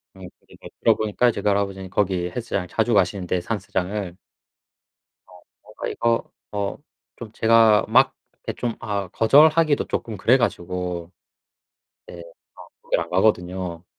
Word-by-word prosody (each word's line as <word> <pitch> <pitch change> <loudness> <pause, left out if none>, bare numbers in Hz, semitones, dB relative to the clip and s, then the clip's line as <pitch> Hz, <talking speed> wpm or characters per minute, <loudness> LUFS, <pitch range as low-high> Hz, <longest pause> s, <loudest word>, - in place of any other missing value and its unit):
음 95 -2 -11
그리고 - - -15
들어 - - +4
보니까 110 +3 +1
이제 100 - -3
그 105 - +1
할아버지는 100 -2 -2
거기 90 -3 0
헬스장을 100 -6 -3
자주 115 +1 0
가시는데 95 -2 +1
산스장을 95 -2 -4 1.1
어 90 -1 -18 0.2
뭔가 - - -7
이거 115 0 -1 0.2
어 100 -1 -3 0.4
좀 115 -3 -9
제가 115 -1 +4
막 130 +5 +4 0.3
이렇게 - - -3
좀 120 -2 -2
아우 100 -3 -3
거절하기도 150 +5 +4
쪼끔 110 -3 -4
그래 120 +7 +4
가지고 90 -5 -3 1.0
예 85 - -10 0.4
어 - - -14
거기를 - - -1
안 - - -15
가거든요. 90 -2 0
100 Hz, 305 characters per minute, -22 LUFS, 90-115 Hz, 1.1 s, 들어